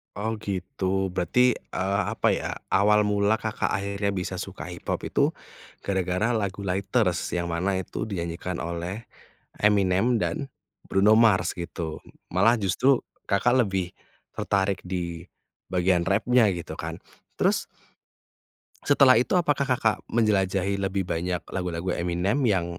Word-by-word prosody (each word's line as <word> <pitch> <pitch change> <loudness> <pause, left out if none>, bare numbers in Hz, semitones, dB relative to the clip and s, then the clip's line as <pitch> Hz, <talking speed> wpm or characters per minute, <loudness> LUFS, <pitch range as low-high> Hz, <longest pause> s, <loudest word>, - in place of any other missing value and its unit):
Oh 110 +2 -2
gitu, 95 -1 -2
berarti, 115 +8 +2
eee, 100 +1 -2
apa - - +2
ya, - - -4
awal 105 +1 +3
mula 105 +1 +2
Kakak 110 -1 -2
akhirnya 100 +1 -1
bisa 95 -1 -3
suka 95 -1 -6
hiphop 90 -1 -4
itu, - - +2 0.5
gara-gara 95 +4 0
lagu 100 -2 -3
Lighters, 95 +2 0
yang 85 -1 -1
mana 95 +3 0
itu 95 - -5
dinyanyikan 85 -3 -4
oleh 85 +6 -5 0.5
Eminem 105 +3 +3
dan 140 +2 -2 0.4
Bruno 100 +3 +4
Mars 110 -4 +4
gitu. 85 -3 -5 0.3
Malah 110 +6 +3
justru 120 +8 +3 0.3
Kakak 120 +5 +3
lebih 95 -3 -3 0.4
tertarik 95 -1 0
di 85 -2 -4 0.5
bagian 90 -1 +2
rap-nya 110 +2 +3
gitu 85 -2 -6
kan. - - -6 0.4
Terus - - +2 1.2
setelah 140 -2 +6
itu 125 +10 +2
apakah 150 -5 +1
Kakak 115 -5 +1
menjelajahi 100 -3 +1
lebih 95 -1 -1
banyak 90 +1 -2
lagu-lagu 90 -1 -2
Eminem 90 +9 0
yang 95 -4 +2
95 Hz, 125 wpm, -26 LUFS, 90-110 Hz, 1.2 s, setelah